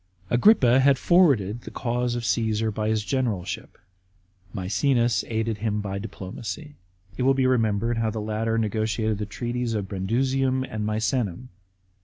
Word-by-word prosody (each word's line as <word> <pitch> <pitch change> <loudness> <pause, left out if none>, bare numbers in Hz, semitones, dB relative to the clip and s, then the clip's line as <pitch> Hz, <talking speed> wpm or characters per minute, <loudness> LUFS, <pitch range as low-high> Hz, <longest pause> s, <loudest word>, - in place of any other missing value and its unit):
Agrippa 125 - +5
had 135 0 +4
forwarded 125 - +3
the - - -9
cause 120 +1 -2
of 120 -1 -3
Caesar 110 +1 0
by 110 +1 -2
his 110 -1 0
generalship; 115 -9 -2 0.7
Maecenas 115 +6 +1
aided 110 -1 -2
him 105 -1 -1
by 100 -1 -4
diplomacy. 110 +8 -7 0.4
It - - -3
will 135 +1 +4
be 130 -1 +2
re 130 -1 +3
membered 115 +2 0
how 115 -1 +1
the 110 - -4
latter 110 +1 -1
negotiated 110 0 -1
the 105 - -3
treaties 120 +2 -3
of 100 -2 -2
Brundusium 130 +7 0
and 110 -4 -4
Misenum. 110 0 -1
115 Hz, 150 wpm, -25 LUFS, 105-125 Hz, 0.7 s, Agrippa